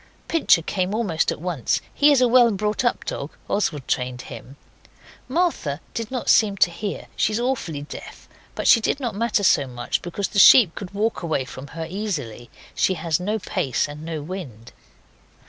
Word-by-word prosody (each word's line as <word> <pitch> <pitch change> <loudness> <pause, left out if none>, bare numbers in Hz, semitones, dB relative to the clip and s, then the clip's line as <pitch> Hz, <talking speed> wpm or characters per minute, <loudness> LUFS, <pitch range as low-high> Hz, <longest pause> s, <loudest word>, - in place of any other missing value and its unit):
Pincher 305 - +3
came 185 +3 -2
almost 195 -9 0
at - - -5
once. 165 -7 -1
He 295 +1 +5
is 275 -3 +4
a 250 - +5
well 240 0 +6
brought 210 +2 -1
up 240 - 0
dog 140 - -5
Oswald 155 -10 -1
trained 125 -1 -2
him. 125 +2 -10 0.7
Martha 260 - -1
did 230 -1 -4
not 255 -2 -4
seem 205 -3 +4
to 175 - +3
hear. 200 +4 -5
She 215 - +1
is 215 - 0
awfully 235 - -2
deaf, 145 - -10 0.3
but - - -4
she 230 - +7
did 275 - 0
not 245 -4 -3
matter 210 0 0
so 140 -6 +3
much, 120 -1 -3
because 185 +3 -3
the 200 - 0
sheep 195 -3 +8
could 195 -4 -7
walk 220 +3 -1
away 160 -6 -1
from 130 +1 -9
her 165 - -3
easily. 160 - -5 0.2
She 190 - +1
has 160 -1 -1
no 210 +5 -1
pace 135 - -1
and 145 +1 -9
no 160 -2 -5
wind. 145 - -8
185 Hz, 185 wpm, -23 LUFS, 145-220 Hz, 0.7 s, sheep